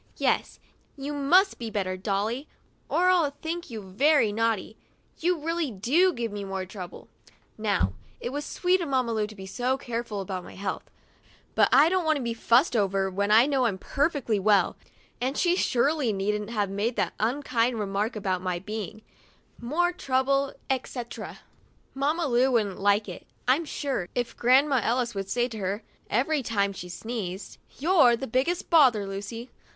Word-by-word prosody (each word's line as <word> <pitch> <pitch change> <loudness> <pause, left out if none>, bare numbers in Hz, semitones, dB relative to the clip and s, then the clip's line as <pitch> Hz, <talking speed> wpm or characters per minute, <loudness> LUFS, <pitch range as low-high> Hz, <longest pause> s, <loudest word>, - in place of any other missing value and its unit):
Yes, - - 0 0.4
you 280 +2 -4
must 350 +8 +3
be 230 -2 -4
better, 190 -3 -2
Dolly, 210 +8 -2 0.4
or 365 +1 +3
I'll 340 -5 +3
think 340 +2 -4
you 220 -3 -6
very 230 +5 +3
naughty. 220 -1 -1 0.4
You 355 +1 +1
really 330 0 -1
do 265 - +3
give 235 - -3
me 205 -1 -5
more 195 -1 -4
trouble 185 -2 -9 0.2
— - - -26
" - - -38
Now, 95 - +2 0.3
it 240 - -4
was 290 +2 -3
sweet 365 +4 +1
of 330 - -3
Mamma 255 -3 +1
Lu 215 -1 0
to 215 - -12
be 190 -1 -9
so 250 +7 -1
careful 235 -4 -4
about 190 -1 -4
my - - -12
health; 190 0 -4 0.6
but - - +4
I 280 +4 +7
don't 370 +1 +1
want 315 -1 +2
to 270 - -4
be 235 -1 -1
fussed 235 +5 +3
over 195 -2 +1
when 200 +2 -1
I 220 +3 +7
know 275 -3 +1
I'm 200 -4 -2
perfectly 275 - 0
well, 205 +1 +3 0.5
and 260 +3 -1
she 350 0 +3
surely 275 -4 +1
needn't 210 +1 -1
have 205 -4 -1
made 215 +5 -1
that - - 0
unkind 240 0 0
remark 205 +3 -1
about 190 -3 -1
my 180 -1 -1
being 215 +2 -6 0.3
" - - -35
more 350 +3 +2
trouble, 275 -2 +1
etc." 250 -2 -4 0.5
Mamma 300 +5 0
Lu 255 -1 +3
wouldn't 210 -5 +1
like 205 +2 +2
it, 180 - -9 0.2
I'm 280 +6 +3
sure, 270 - -3
if 245 -1 -2
Grandma 265 +2 +4
Ellis 240 0 0
would 195 -1 -4
say 240 +3 +1
to 220 -2 -7
her, 195 +2 -2 0.3
every 275 +6 +1
time 200 -4 0
she 180 -1 -8
sneezed: 195 -2 -6 0.2
"You're 285 -6 +5
the 270 - -5
biggest 270 +11 -1
bother, 255 -11 +5
Lucy!' 200 +5 -6
235 Hz, 175 wpm, -27 LUFS, 200-280 Hz, 0.6 s, I